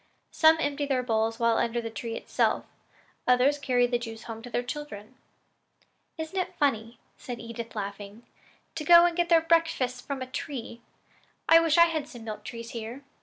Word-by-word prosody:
Some 320 0 +5
empty 290 -1 -1
their 260 -2 0
bowls 225 -1 0
while 230 -1 +2
under 235 0 0
the 225 -1 -5
tree 225 +1 -5
itself; - - 0 0.6
others 255 +4 +4
carry 250 -4 +2
the 240 0 0
juice 225 -2 -8
home 225 -1 -8
to 245 - -9
their 245 0 -1
children." 245 -5 -7 1.0
"Isn't 320 +4 -4
it 365 - -3
funny," 230 -5 0 0.2
said 245 -2 -7
Edith, 230 0 -8
laughing, 200 +2 -6 0.5
"to 320 - -5
go 340 +2 +8
and 350 -1 +1
get 345 0 0
their 335 -1 +6
breakfasts 325 -7 +1
from 275 -2 -5
a - - -5
tree? 255 -2 -6 0.7
I 330 +1 +8
wish 330 -1 +2
we 340 - +9
had 320 -4 -1
some 240 -5 -11
milk 215 -2 -7
trees 230 0 -8
here." 235 +4 -7
250 Hz, 180 wpm, -27 LUFS, 230-300 Hz, 1.0 s, we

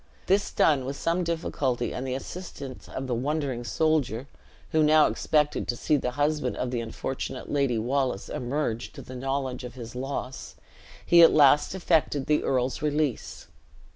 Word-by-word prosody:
This 195 +1 +2
done, 145 -4 +3
with 135 +2 -4
some 170 +4 0
difficulty, 140 -7 -1
and 130 +1 -4
the 130 - -2
assistance 140 -3 -8
of 130 - -5
the 130 - -2
wondering 135 0 -2
soldier 140 -4 0 0.5
(who 160 - +3
now 155 0 +6
expected 150 -1 +1
to 120 - -1
see 150 - +1
the 130 -3 0
husband 145 -3 0
of 125 - -2
the 120 -2 -1
unfortunate 130 +3 -5
Lady 140 -5 +1
Wallace 125 -1 -1
emerge 125 -2 -3
to - - -9
the 130 - -10
knowledge 135 0 -3
of 125 0 -8
his 115 -2 -8
loss), 130 0 -5 0.5
he 170 0 +7
at 165 - +9
last 150 +3 +5
effected 160 -6 +1
the 150 0 +2
earl's 130 -1 0
release. 150 -4 -1
135 Hz, 165 wpm, -27 LUFS, 125-150 Hz, 0.5 s, at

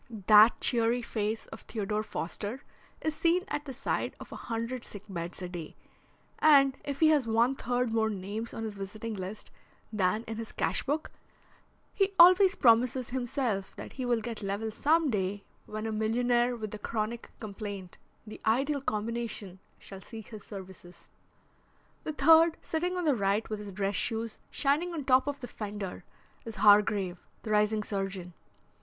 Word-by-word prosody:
That 215 +2 +7
cheery 235 0 +2
face 220 -1 -2
of 225 - -8
Theodore 210 -1 -2
Foster 210 +5 -5 0.4
is 315 - -1
seen 345 +3 +2
at 295 -6 -3
the 275 - -6
side 265 +1 -2
of - - -11
a - - -6
hundred 230 +2 -4
sick 205 -1 -8
beds 175 -1 -5
a - - -3
day, 175 -3 -7 0.6
and 275 -3 +6
if 280 0 -5
he 315 - +7
has 290 -6 +3
one 230 +4 +3
third 245 -2 -1
more 220 -1 +2
names 210 +3 -5
on 225 - -5
his 220 -2 -4
visiting 210 +3 -6
list 195 +1 -7 0.4
than 210 +2 +1
in 225 -1 -6
his 225 -1 -7
cash - - 0
book 295 +3 -2 0.8
he 390 0 +1
always 370 +3 +8
promises 245 +1 +3
himself 245 -5 -2
that - - -9
he 260 - -5
will 240 -2 +1
get 230 0 -6
level 205 +2 -2
some 305 +5 +2
day 200 -1 -2 0.2
when 215 +1 -5
a 220 - -2
millionaire 240 +3 +1
with 215 -3 -6
a 215 - -6
chronic 225 +2 -3
complaint 200 -3 -7 0.3
the 215 - -10
ideal 275 +6 +1
combination 215 -4 -3 0.2
shall 195 -1 -10
seek 220 +1 -10
his 215 -2 -9
services. 185 -3 -11 0.9
The 310 - -2
third, 325 +3 +6
sitting 355 +3 -2
on 355 - -1
the 295 - +4
right 200 +1 0
with 215 - -2
his 205 -1 -7
dress 195 0 -1
shoes 225 -1 -1
shining 305 +5 0
on 320 - -3
the - - -10
top 260 +1 +4
of 285 -2 -3
the 245 - -5
fender, 205 -4 -6 0.4
is 225 -2 -7
Hargrave, 205 -3 +4 0.2
the 215 - -4
rising 210 0 +2
surgeon. 195 -3 -4
225 Hz, 170 wpm, -30 LUFS, 205-260 Hz, 0.9 s, always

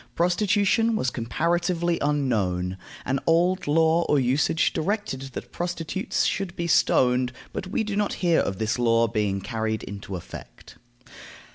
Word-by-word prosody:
Prostitution 205 +5 +2
was 130 -11 0
comparatively 170 +7 0
unknown. 105 -11 0 0.3
An 135 +2 0
old 175 +2 +2
law 160 +2 +3
or 145 - +4
usage 135 +5 +1
directed 200 -5 -2
that - - -7
prostitutes 175 +4 -2
should 195 -3 -2
be 170 - -3
stoned, 125 -6 +3 0.2
but 180 - -4
we 210 +3 -1
do 210 -2 -3
not 205 0 0
hear 170 -3 +2
of 95 - -1
this 110 +2 -1
law 115 -1 +3
being 105 -3 -1
carried 110 +1 -3
into 100 -1 -7
effect. 90 - -11
155 Hz, 140 wpm, -25 LUFS, 115-180 Hz, 0.3 s, or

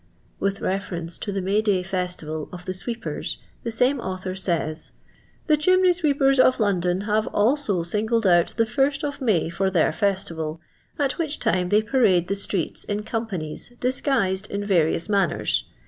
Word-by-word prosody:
With 195 0 -1
reference 175 -3 -3
to 205 - -3
the 195 -1 -2
May 200 +3 +2
day 200 -4 +1
festival 180 -5 -3
of 180 0 -9
the 185 - -3
sweepers 230 +5 -4 0.2
the 230 - -4
same 250 +4 +2
author 185 -3 -4
says: 170 -4 -2 0.2
— - - -32
*' - - -35
The 305 - +4
chimney 370 +3 +4
sweepers 280 -5 +2
of 255 0 +5
Lond(m 185 -3 +1
have 215 0 +1
also 210 - +1
singled 220 +5 0
out 175 -2 +3
the 230 - +4
iirst 275 +5 0
of 285 -1 -3
May 190 -10 +1
for 190 +3 0
their 175 -4 +2
festival, 165 -5 -1 0.4
at 285 +1 -1
which 310 -3 -1
time 185 -6 0
they 210 +2 +4
parade 210 -8 +3
the - - +2
striM^ts 200 -3 -2
in 205 0 -1
comjvanies, 220 -1 -4
disguised 245 -7 0
in 200 +1 -3
various 170 -4 +1
manners. 195 - +1
200 Hz, 170 wpm, -24 LUFS, 180-240 Hz, 0.4 s, of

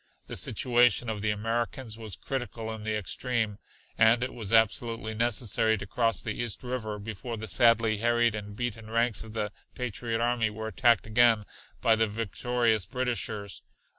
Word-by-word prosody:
The - - -6
situation 120 -2 +2
of 105 -2 -5
the 105 - 0
Americans 115 +3 -2
was 110 -4 -6
critical 120 -4 -4
in 110 - -8
the 110 0 -1
extreme, 110 +1 -1 0.4
and 115 +2 +5
it 130 - -3
was 110 -4 -4
absolutely 115 0 +2
necessary 110 -1 +1
to 100 - -6
cross 115 +2 0
the 110 - -2
East 120 0 -3
River 120 -4 -4
before 110 +3 -6
the 110 - -5
sadly 110 +3 +4
harried 120 +1 +2
and 105 -1 -7
beaten 115 -3 -4
ranks 115 0 +1
of 110 -1 -11
the 105 -2 -2 0.2
patriot 115 -1 -2
army 120 -2 +1
were 110 +1 -5
attacked 120 -1 +3
again 110 -1 +4 0.4
by 115 - +4
the 110 0 +2
victorious 115 0 0
Britishers. 115 -5 -2
115 Hz, 165 wpm, -28 LUFS, 110-120 Hz, 0.4 s, and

